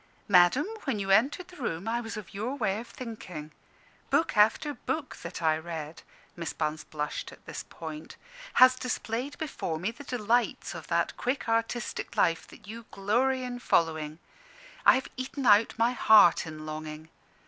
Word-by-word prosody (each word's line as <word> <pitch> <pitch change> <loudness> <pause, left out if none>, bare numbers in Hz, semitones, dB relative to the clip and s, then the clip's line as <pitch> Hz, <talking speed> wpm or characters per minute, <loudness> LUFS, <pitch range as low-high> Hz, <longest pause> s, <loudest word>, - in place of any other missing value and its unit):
"Madam, 185 +8 +5 0.2
when 265 -6 0
you 195 -1 -2
entered 275 - +3
the 360 - -14
room 190 -3 -3
I 235 +1 0
was 225 -2 -6
of 210 -5 -9
your 225 +7 -3
way 195 -7 0
of 235 - -8
thinking. 185 -11 -8 0.6
Book 325 - +2
after 220 +8 +4
book 310 0 -4
that 170 0 -7
I 155 -1 +3
read" 160 -1 -7 0.3
Miss 170 -1 -4
Bunce 155 0 -2
blushed 150 -1 -4
at - - -16
this - - -6
point 155 -1 -8 0.4
"has 255 0 +8
displayed 255 +1 -3
before 275 - -3
me 185 +7 -2
the 265 +5 -12
delights 240 -2 0
of - - -8
that - - 0
quick 255 +3 -2
artistic 230 +1 -2
life 165 -1 +2
that - - -15
you 225 +2 -8
glory 250 +7 +1
in 245 -1 -5
following. 160 -7 +1 0.7
I - - +9
have 260 - -2
eaten 260 +1 -4
out 210 +1 +5
my 230 +2 +3
heart 215 -9 +6
in 155 -1 -8
longing. 155 0 -7
215 Hz, 170 wpm, -29 LUFS, 165-250 Hz, 0.7 s, I